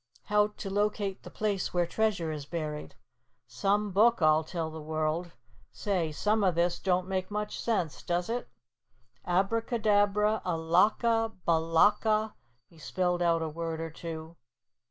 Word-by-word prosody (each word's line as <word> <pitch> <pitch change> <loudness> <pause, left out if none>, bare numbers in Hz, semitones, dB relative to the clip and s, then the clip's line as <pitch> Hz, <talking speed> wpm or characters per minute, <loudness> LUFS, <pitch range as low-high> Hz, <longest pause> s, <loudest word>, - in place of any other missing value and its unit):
'HOW 210 0 +3
TO 195 - -5
LOCATE 205 -1 -1
THE - - -10
PLACE 205 -4 -2
WHERE 175 -1 +3
TREASURE 195 -3 0
IS 145 -2 -6
BURIED.' 155 -3 -5 0.5
Some 205 +1 0
book, 225 +5 +4
I'll 155 -1 +4
tell 160 0 -4
the 160 0 -8
world! 155 +2 -2 0.4
Say, 185 -7 -1
some 210 +7 +1
of 185 -3 +2
this 175 +1 +1
don't 185 -1 0
make 185 -1 -2
much 210 0 -3
sense, 190 -10 -1
does 175 0 -1
it? 240 +1 -3 0.8
'Abacadabra, 210 +1 +2
alaka, 210 +7 +2
balaka, 205 +7 +3 0.2
'" 125 0 -42
he 165 - -18
spelled 180 +2 -1
out 165 -1 +2
a - - -2
word 165 +1 -4
or 165 0 -4
two. 165 0 -8
180 Hz, 145 wpm, -29 LUFS, 165-210 Hz, 0.8 s, book